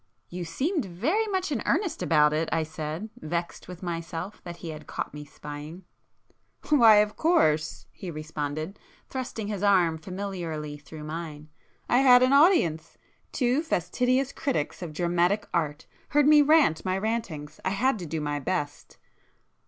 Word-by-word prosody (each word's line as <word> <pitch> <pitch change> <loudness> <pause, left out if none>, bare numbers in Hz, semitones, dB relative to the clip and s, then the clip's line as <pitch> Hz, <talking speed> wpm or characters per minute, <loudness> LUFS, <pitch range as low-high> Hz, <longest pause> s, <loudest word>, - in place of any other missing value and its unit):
"You 175 0 -5
seemed 290 - -1
very 285 - 0
much 375 -5 -1
in 250 -7 -1
earnest 340 -2 0
about 150 -2 +4
it!" 160 +1 0
I 165 -1 +1
said, 160 +6 -5
vexed 170 +2 -4
with 180 0 -9
myself 170 +3 -5
that 175 -1 -7
he 170 - -7
had 155 -1 -8
caught - - -4
me 150 0 -7
spying. 150 +5 -9 0.9
"Why, 235 -8 +7
of 210 0 +3
course!" 160 - +2
he 185 - -8
responded, 155 +2 -5 0.3
thrusting 245 -5 -4
his 205 -2 -4
arm 180 -6 +3
familiarly 170 -5 -5
through 150 +1 -10
mine—"I 155 +7 -4
had 250 -2 +7
an 255 +2 +4
audience! 180 - +3 0.3
Two 255 +2 +1
fastidious 255 - 0
critics 270 - -2
of 170 -3 -5
dramatic 175 +5 +1
art 150 -3 -1 0.2
heard 295 -1 +4
me 300 0 +8
rant 290 - +4
my 185 0 0
rantings,—I 185 -8 -3
had 225 +4 +1
to 175 - -6
do 160 +1 -3
my 145 -1 -2
best!" 145 0 -4
175 Hz, 150 wpm, -27 LUFS, 155-245 Hz, 0.9 s, me